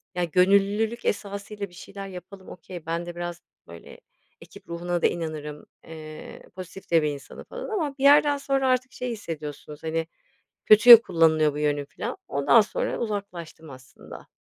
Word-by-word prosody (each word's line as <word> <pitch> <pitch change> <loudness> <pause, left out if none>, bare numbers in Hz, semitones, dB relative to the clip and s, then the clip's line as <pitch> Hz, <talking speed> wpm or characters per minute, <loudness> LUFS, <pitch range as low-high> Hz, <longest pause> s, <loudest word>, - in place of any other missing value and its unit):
ya, 180 - 0
gönüllülük 200 +5 +2
esasıyla 200 0 -4
bir - - -22
şeyler 195 +2 -9
yapalım, 190 +1 -11
okay, 175 -1 -10
ben 165 +1 -3
de 175 0 -8
biraz, 175 0 -6 0.3
böyle, 85 0 -13 0.4
ekip - - -15
ruhuna 175 +1 -3
da - - +5
inanırım, 155 -3 -6 0.2
eee, 155 -1 -10
pozitif 185 +1 -10
de 165 -1 +5
bir 150 - 0
insanım 140 -1 -9
falan - - -7
ama 315 -10 -3
bir 270 - -5
yerden 290 0 +6
sonra 275 -1 0
artık 255 0 0
şey 250 - -5
hissediyorsunuz, 150 -7 -8
hani, 160 0 -2 0.6
kötüye 225 +2 +10
kullanılıyor 160 -5 +2
bu - - -6
yönüm 145 -1 0
filan. - - -6
Ondan 140 +12 +4
sonra 210 - -3
uzaklaştım 185 -7 -6
aslında. 130 -1 -13
175 Hz, 160 wpm, -25 LUFS, 155-210 Hz, 0.6 s, kötüye